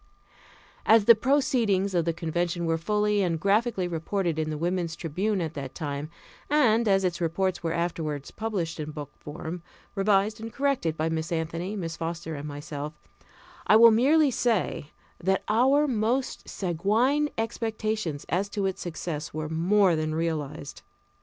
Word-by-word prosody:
As 220 -1 +5
the 235 - +10
proceedings 230 -6 +1
of 170 -2 +1
the 170 - +2
contention 170 +1 -2
were 165 0 0
fully 210 +3 +1
and 170 -4 0
graphically 200 0 +1
reported 170 0 -2
in 155 0 -1
the 155 - -3
Woman's 170 0 -1
Tribune 190 +5 -1
at 160 -2 -3
that 135 -4 -6
time, 145 -1 -4 0.4
and 235 -6 +3
as 195 -1 +3
its 175 -1 -1
reports 175 +2 0
were 165 -1 -1
afterward 160 -4 -2
published 190 -7 -3
in 155 0 -4
book 150 -2 -7
form, 160 +3 -6 0.3
revised 205 +2 +2
and 225 0 -6
corrected 270 - 0
by 155 - 0
Miss 160 +1 -2
Anthony, 170 +4 -2
Miss 165 -5 -4
Foster, 165 0 -4
and 145 0 -6
myself, 145 +1 -6 0.7
I - - +6
will 230 +1 +9
merely 280 +6 +4
say 225 - 0 0.3
that 190 +2 +1
our 265 +7 +4
most 245 +2 -1
sanguine 220 - +1
expectations 220 -7 -2
as 195 +4 0
to 200 -1 -2
its 190 -1 -2
success 160 -3 -5
were 155 -1 -3
more 180 +3 +3
than 155 0 -1
realized. 160 -4 -3
180 Hz, 155 wpm, -27 LUFS, 160-215 Hz, 0.7 s, the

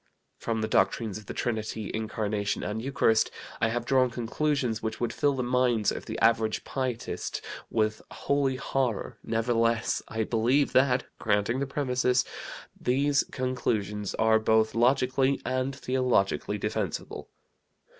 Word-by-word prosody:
"From 115 -1 -2
the 110 - 0
doctrines 105 +1 +1
of 105 - -16
the - - -5
Trinity, 110 -2 -2
Incarnation, 105 -2 -2
and 105 +2 -3
Eucharist, 115 -4 +2 0.3
I - - +4
have 120 +1 -2
drawn 130 0 +3
conclusions 125 0 -1
which 110 0 -3
would 120 -1 -1
fill 145 +2 +1
the 130 - -1
minds 120 -3 +2
of - - -6
the 110 0 -4
average 115 -1 +2
pietist 130 -3 -3 0.3
with 110 -1 0
holy 140 -2 0
horror; 130 -4 -2
nevertheless 115 0 +1
I 110 0 -1
believe 120 +6 +2
that 130 -1 +4 0.2
(granting 105 +5 +1
the 140 - -1
premises) 125 -2 +1 0.5
these 140 +3 +2
conclusions 105 -6 -2
are 110 0 +4
both 110 0 +3
logically 130 +3 +2
and 130 +1 -1
theologically 125 - 0
defensible. - - -3
120 Hz, 135 wpm, -28 LUFS, 110-130 Hz, 0.5 s, I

